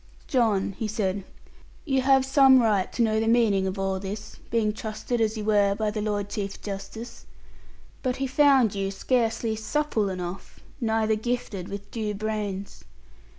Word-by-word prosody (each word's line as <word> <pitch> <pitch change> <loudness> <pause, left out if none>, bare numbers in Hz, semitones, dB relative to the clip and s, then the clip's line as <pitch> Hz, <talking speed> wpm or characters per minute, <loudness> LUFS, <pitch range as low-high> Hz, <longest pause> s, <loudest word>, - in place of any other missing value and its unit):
'John,' 220 -8 +1
he 220 - -1
said, 200 -2 -1 0.6
'you 270 -4 +2
have 265 0 +4
some 270 -1 +6
right 210 -5 +2
to 235 - +1
know 220 -1 +2
the 225 - 0
meaning 220 -5 +3
of 190 +1 -3
all 195 0 -1
this, 205 +2 -7
being 220 -2 +1
trusted 220 +2 -3
as 220 0 +1
you 210 - -4
were 205 -2 +3
by 215 0 -1
the 210 0 -3
Lord 205 -1 -1
Chief 200 -1 -4
Justice. 205 +4 -7 0.7
But 255 -2 -1
he 270 - -2
found 265 -4 +4
you 195 -1 -1
scarcely 225 +2 0
supple 220 -2 0
enough, 180 0 -6 0.2
neither 220 -2 +1
gifted 215 -4 -3
with 200 0 -8
due 215 -3 -3
brains.' 205 -2 -4
215 Hz, 160 wpm, -26 LUFS, 200-235 Hz, 0.7 s, some